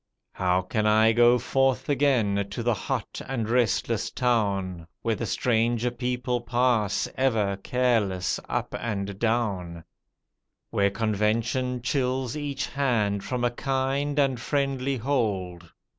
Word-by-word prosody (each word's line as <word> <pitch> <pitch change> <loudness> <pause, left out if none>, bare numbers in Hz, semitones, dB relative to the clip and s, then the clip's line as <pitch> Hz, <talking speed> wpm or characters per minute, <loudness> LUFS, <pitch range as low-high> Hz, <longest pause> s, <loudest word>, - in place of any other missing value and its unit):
How 90 0 +1
can 105 +3 0
I 110 +1 +5
go 120 +1 +5
forth 130 +2 +1
again 120 -9 +2
to 110 +4 -4
the 120 0 +2
hot 100 - -4
and 120 -5 -2
restless 120 -2 +1
town. 100 -8 0 0.2
Where 115 - +1
the 115 +1 -3
stranger 120 +1 +1
people 125 0 -2
pass 120 -3 +1
ever 110 -7 +1
careless 105 -6 0
up - - -2
and 100 -3 -3
down, 100 -8 -1 0.9
Where 100 0 +2
convention 115 +4 0
chills 130 -1 -1
each 145 -2 -3
hand 110 -8 0
from 125 -1 -3
a 120 - +2
kind 135 +3 -1
and 135 -4 +2
friendly 135 0 -1
hold? 100 -9 -2
120 Hz, 125 wpm, -26 LUFS, 100-130 Hz, 0.9 s, I